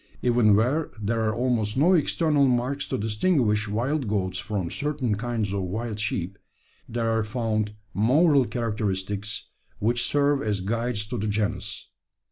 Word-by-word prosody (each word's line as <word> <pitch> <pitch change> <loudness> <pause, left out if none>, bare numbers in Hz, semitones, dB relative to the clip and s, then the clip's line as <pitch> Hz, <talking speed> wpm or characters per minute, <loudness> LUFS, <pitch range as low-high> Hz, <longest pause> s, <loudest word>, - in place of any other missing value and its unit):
Even 120 -4 +4
where 130 +9 +1
there 110 +2 -1
are 110 - -2
almost 120 -3 0
no 165 +7 +5
external 150 -3 +3
marks 125 +3 0
to 130 - -1
distinguish 110 - +1
wild 125 +6 -1
goats 95 -3 -1
from 100 -3 -3
certain 145 -6 -1
kinds 110 -2 -2
of 100 - -1
wild 105 +4 -3
sheep, 100 -2 -2 0.5
there 115 -1 -1
are 115 -1 +1
found 110 -1 -2 0.2
moral 140 - +4
characteristics 105 -3 -3 0.3
which 120 +3 +1
serve 145 -1 +2
as 105 -5 -1
guides 115 +2 -1
to 120 +2 -4
the 105 - -1
genus. 105 -1 -2
110 Hz, 145 wpm, -25 LUFS, 105-125 Hz, 0.5 s, no